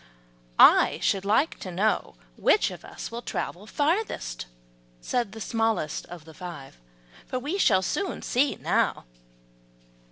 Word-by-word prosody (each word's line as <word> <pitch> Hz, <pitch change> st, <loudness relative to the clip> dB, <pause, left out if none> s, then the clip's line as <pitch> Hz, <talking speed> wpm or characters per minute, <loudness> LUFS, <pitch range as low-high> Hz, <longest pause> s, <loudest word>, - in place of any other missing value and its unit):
"I -, -, +7 dB
should 195 Hz, 0 st, +1 dB
like 225 Hz, +10 st, +2 dB
to 185 Hz, -, -6 dB
know 195 Hz, -, 0 dB, 0.2 s
which -, -, +3 dB
of -, -, -10 dB
us -, -, -8 dB
will 235 Hz, +1 st, -5 dB
travel 205 Hz, -3 st, -4 dB
furthest," 290 Hz, -, -1 dB, 0.5 s
said 235 Hz, -, -1 dB
the 220 Hz, -, -9 dB
smallest 225 Hz, -8 st, -1 dB
of 170 Hz, -3 st, -10 dB
the 160 Hz, -, -13 dB
five; 150 Hz, -, -9 dB, 0.5 s
"we 290 Hz, +10 st, -2 dB
shall 190 Hz, -, +4 dB
soon 380 Hz, -, -2 dB
see 265 Hz, +3 st, +1 dB
now." -, -, 0 dB
215 Hz, 130 wpm, -26 LUFS, 175-255 Hz, 0.5 s, I